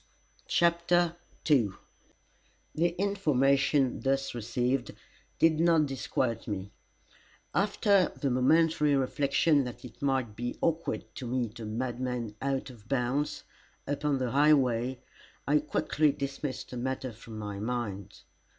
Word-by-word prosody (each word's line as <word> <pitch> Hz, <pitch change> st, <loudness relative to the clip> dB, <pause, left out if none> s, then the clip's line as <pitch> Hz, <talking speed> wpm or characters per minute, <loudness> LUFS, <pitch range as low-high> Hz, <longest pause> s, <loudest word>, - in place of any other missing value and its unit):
CHAPTER 170 Hz, 0 st, +2 dB, 0.3 s
II 120 Hz, -11 st, +3 dB, 1.0 s
The 170 Hz, +2 st, +1 dB
information 140 Hz, -8 st, +2 dB
thus 135 Hz, 0 st, 0 dB
received 120 Hz, +2 st, -1 dB, 0.4 s
did 160 Hz, -1 st, +4 dB
not 165 Hz, -2 st, +4 dB
disquiet 130 Hz, -3 st, -2 dB
me. 100 Hz, -2 st, -4 dB, 0.8 s
After 200 Hz, -1 st, +3 dB
the 140 Hz, -3 st, 0 dB
momentary 150 Hz, +3 st, +3 dB
reflection 140 Hz, +3 st, +2 dB
that 125 Hz, +1 st, -8 dB
it 120 Hz, -, -13 dB
might 130 Hz, -6 st, 0 dB
be 120 Hz, +2 st, -4 dB
awkward 165 Hz, 0 st, -1 dB
to 130 Hz, -, -6 dB
meet 120 Hz, -2 st, -2 dB
a 110 Hz, -, -5 dB
madman, 120 Hz, 0 st, -3 dB
out 135 Hz, -1 st, -2 dB
of 115 Hz, -3 st, -17 dB
bounds, 135 Hz, +3 st, -1 dB, 0.4 s
upon 145 Hz, 0 st, 0 dB
the 130 Hz, -2 st, -2 dB
highway, 130 Hz, -4 st, +3 dB, 0.5 s
I 150 Hz, +2 st, +4 dB
quickly 150 Hz, 0 st, +1 dB
dismissed 140 Hz, -1 st, -5 dB
the 125 Hz, -, -5 dB
matter 130 Hz, +1 st, -3 dB
from 110 Hz, 0 st, -10 dB
my 105 Hz, -2 st, -5 dB
mind. 105 Hz, -4 st, -4 dB
135 Hz, 120 wpm, -29 LUFS, 120-150 Hz, 1.0 s, did